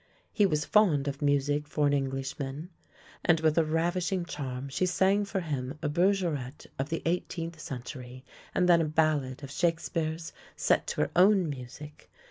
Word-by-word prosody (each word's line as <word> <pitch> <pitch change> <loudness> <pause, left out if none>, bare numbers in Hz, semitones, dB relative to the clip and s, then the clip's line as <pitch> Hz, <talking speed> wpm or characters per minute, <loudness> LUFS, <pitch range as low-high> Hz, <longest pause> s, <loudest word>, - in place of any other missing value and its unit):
He 205 -2 +4
was 150 -3 0
fond 165 -10 +3
of 140 +1 -3
music 145 +1 +1
for 150 0 0
an 145 - +3
Englishman, 135 +3 -3 0.5
and 165 -1 +4
with 155 -1 +3
a - - +4
ravishing 175 +3 0
charm 135 -5 -5
she 140 +7 0
sang 195 +3 +2
for 195 -1 -2
him 140 -3 -4
a 150 - +1
berge 185 +5 +2
rette 145 -5 -4
of 135 +2 -1
the 165 - -3
eighteenth 165 -1 -2
century 130 -1 -8 0.3
and 180 - +3
then 170 -1 +6
a - - +1
ballad 150 -4 0
of 140 - -7
Shakespeare's 165 0 -1 0.2
set - - +2
to - - -1
her - - 0
own 185 -3 +5
music. 140 +3 -10
155 Hz, 170 wpm, -29 LUFS, 140-175 Hz, 0.5 s, then